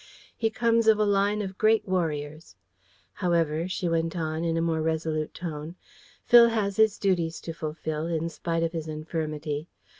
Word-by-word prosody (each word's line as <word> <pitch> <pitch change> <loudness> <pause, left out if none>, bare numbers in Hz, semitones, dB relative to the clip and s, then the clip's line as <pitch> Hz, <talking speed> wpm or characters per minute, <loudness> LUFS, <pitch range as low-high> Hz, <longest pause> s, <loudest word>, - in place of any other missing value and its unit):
"He 225 - 0
comes 230 0 +2
of 220 -1 +6
a 215 - +2
line 205 +1 +2
of 190 -1 -7
great 220 0 +3
warriors. 155 -4 -3 0.6
However," 170 -3 0
she 185 -1 -2
went 165 0 0
on, 160 0 -2
in 165 -1 0
a - - +2
more 165 -1 0
resolute 155 -1 -1
tone, 160 -1 -6 0.5
"Phil 235 -1 +8
has 205 -4 -1
his 220 -1 +4
duties 170 -5 0
to 165 - -6
fulfil, 155 0 -4
in 165 -1 -1
spite 165 0 -2
of 165 - 0
his 160 -2 -5
infirmity. 155 -1 -4
165 Hz, 170 wpm, -27 LUFS, 155-200 Hz, 0.6 s, Phil